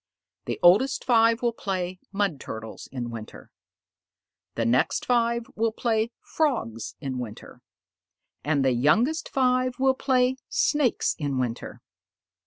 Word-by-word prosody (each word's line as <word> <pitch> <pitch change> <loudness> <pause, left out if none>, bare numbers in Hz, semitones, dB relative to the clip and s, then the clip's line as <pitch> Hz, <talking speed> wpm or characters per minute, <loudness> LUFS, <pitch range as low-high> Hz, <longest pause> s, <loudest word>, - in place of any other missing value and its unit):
The - - -3
oldest 210 +11 +5
five 230 -1 +4
will 235 -1 +2
play 185 -4 -3
'Mud 195 -7 -1
Turtles 110 -2 -8
in 120 -2 -4
winter,' 110 -2 -9 1.0
the 115 - 0
next 120 +3 +1
five 235 -1 +1
will 225 +1 +1
play 225 0 0
'Frogs 230 - -2
in 130 -3 -4
winter,' 110 -4 -9 0.8
and 145 -2 +1
the 130 - +3
youngest 225 - +2
five 255 -1 +1
will 265 0 +3
play 260 -1 +1
'Snakes 295 -6 +1
in 140 -3 -2
winter.' 120 -2 -4
215 Hz, 125 wpm, -26 LUFS, -, 1.0 s, oldest